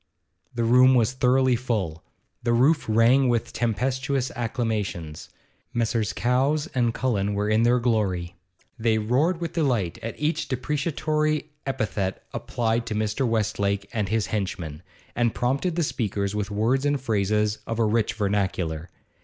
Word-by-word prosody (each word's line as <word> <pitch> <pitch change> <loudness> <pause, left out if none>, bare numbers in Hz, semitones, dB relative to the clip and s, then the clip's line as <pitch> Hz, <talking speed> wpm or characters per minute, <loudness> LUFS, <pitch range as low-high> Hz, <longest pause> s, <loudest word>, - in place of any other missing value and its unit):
The 120 - 0
room 125 +3 +6
was 115 -1 +3
thoroughly 130 0 +3
full; 105 -10 -2 0.4
the 120 0 +1
roof 140 +7 +3
rang 120 +4 +4
with 115 -2 0
tempestuous 130 +3 -1
acclamations. 110 -9 -3 0.5
Messrs. 115 -2 0
Cowes 135 +5 +1
and 120 -2 +2
Cullen 105 -5 -1
were 105 +1 0
in 110 +1 +3
their 120 +1 +4
glory; 100 -8 0 0.4
they 110 -1 +2
roared 135 +11 +1
with 170 -1 -4
delight 120 - 0
at 115 - -6
each 150 +3 0
depreciatory 150 +3 -1 0.2
epithet 100 -7 -2
applied 115 0 -1
to 110 - -2
Mr. 110 +5 0
Westlake 100 -3 0
and 105 -4 -1
his 110 0 +1
henchmen, 90 -7 -4 0.3
and 120 -2 +1
prompted 135 +8 0
the 170 - +1
speakers 100 -7 -2
with 105 -1 -2
words 115 +6 +1
and 145 -1 +1
phrases 105 -3 0
of 115 - -2
a 115 - +2
rich 110 0 +1
vernacular. 95 -6 -1
115 Hz, 145 wpm, -25 LUFS, 105-130 Hz, 0.5 s, room